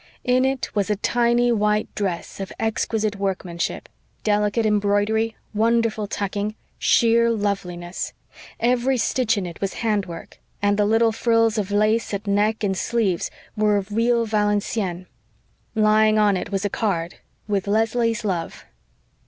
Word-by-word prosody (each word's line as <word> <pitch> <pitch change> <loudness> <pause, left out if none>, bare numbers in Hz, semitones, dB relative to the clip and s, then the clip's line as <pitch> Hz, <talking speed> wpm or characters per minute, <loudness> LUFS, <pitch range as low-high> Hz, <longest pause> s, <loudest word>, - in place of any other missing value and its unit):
In 255 +1 +3
it 265 -1 -2
was 205 -2 0
a 210 - +2
tiny 240 +3 +2
white 210 -1 +1
dress 190 -3 -3
of 195 -1 -5
exquisite 220 -1 -1
workmanship 185 -3 -3 0.4
delicate 210 +1 +1
embroidery, 210 +2 +1 0.2
wonderful 225 -1 +1
tucking, 205 +1 -3 0.2
sheer 235 0 +4
loveliness. 185 -5 -3 0.5
Every 250 +2 +2
stitch 230 -1 +1
in 195 - -2
it 170 -2 -8
was 195 -1 -2
handwork; 195 -6 -3 0.2
and 205 0 +2
the 205 0 +2
little 225 +1 +3
frills 230 -1 +2
of 200 -2 -2
lace 215 +1 +1
at 200 +2 -6
neck 210 +2 +1
and 195 -2 +1
sleeves 195 -3 0 0.3
were 210 -1 +2
of 200 +1 -4
real 230 +2 +2
Valenciennes. 205 -3 -1 0.7
Lying 215 0 +4
on 210 -2 +4
it 185 - -4
was 195 +1 -1
a - - +1
card 175 -6 -2 0.3
"with 200 -2 -1
Leslie's 225 +2 +1
love." 175 -5 -3
210 Hz, 140 wpm, -22 LUFS, 200-225 Hz, 0.7 s, sheer